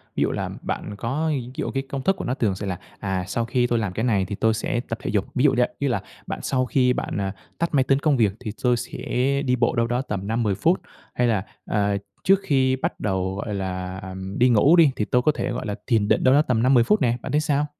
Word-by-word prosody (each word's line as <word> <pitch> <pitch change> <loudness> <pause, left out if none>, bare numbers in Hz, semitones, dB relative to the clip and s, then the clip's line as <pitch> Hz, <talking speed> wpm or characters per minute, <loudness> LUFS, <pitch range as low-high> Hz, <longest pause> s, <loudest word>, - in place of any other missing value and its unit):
ví - - +2
dụ - - 0
là - - -3
bạn 105 - -4
có 135 +9 -1
ví 130 -5 -2
dụ - - -3
cái 135 0 -2
công 135 - -3
thức 190 +8 +2
của - - -6
nó 125 - 0
thường 110 -8 0
sẽ 100 - -5
là, 90 -1 -3 0.2
"À, 95 -2 -2
sau 115 +4 -1
khi 125 +1 +1
tôi 120 -1 +1
làm 105 -5 -2
cái 110 - -2
này 105 -6 +2
thì 100 +2 -4
tôi 110 +2 +2
sẽ 120 +2 -1
tập 115 - -3
thể - - -3
dục", 100 -2 +1
ví 125 - +2
dụ 145 -3 +5
vậy, 125 - +3
như 140 - 0
là 120 - 0 0.3
bạn - - -4
sau 130 -1 +1
khi 125 +1 +2
bạn, - - -3
ờ, 100 -1 -1 0.3
tắt 170 - 0
máy 135 -2 +4
tính 135 +1 +2
công 145 -2 +2
việc 110 -5 +3
thì 110 -4 -5
tôi 125 -1 +3
sẽ - - -6 0.5
đi 125 - +2
bộ 120 -1 +1
đâu 115 -1 +2
đó 120 +1 0
tầm 100 -7 -4
5-10 110 -2 0
phút, 170 - +2 0.3
hay 125 - +1
là, 105 -4 0 0.2
à, 100 -1 +1 0.3
trước 195 0 +5
khi 130 -6 +2
bắt 130 - -3
đầu, 95 -2 -1
gọi 105 +1 -4
là, 95 -1 -4 0.4
đi 125 +1 +5
ngủ 130 +8 +5
đi 165 -5 +6
thì 105 - -1
tôi 125 +3 +2
có 155 - +3
thể, - - -2
gọi 120 - -4
là, 105 -1 -2
thiền 110 -4 +2
định - - +2
đâu 130 - +5
đó 145 - +6
tầm 125 -6 +1
5-10 125 -2 +5
phút 210 - +2
nè, 120 -2 +2
bạn - - -5
thấy 150 - +2
sao? 145 -1 +1
120 Hz, 275 wpm, -23 LUFS, 105-135 Hz, 0.5 s, đi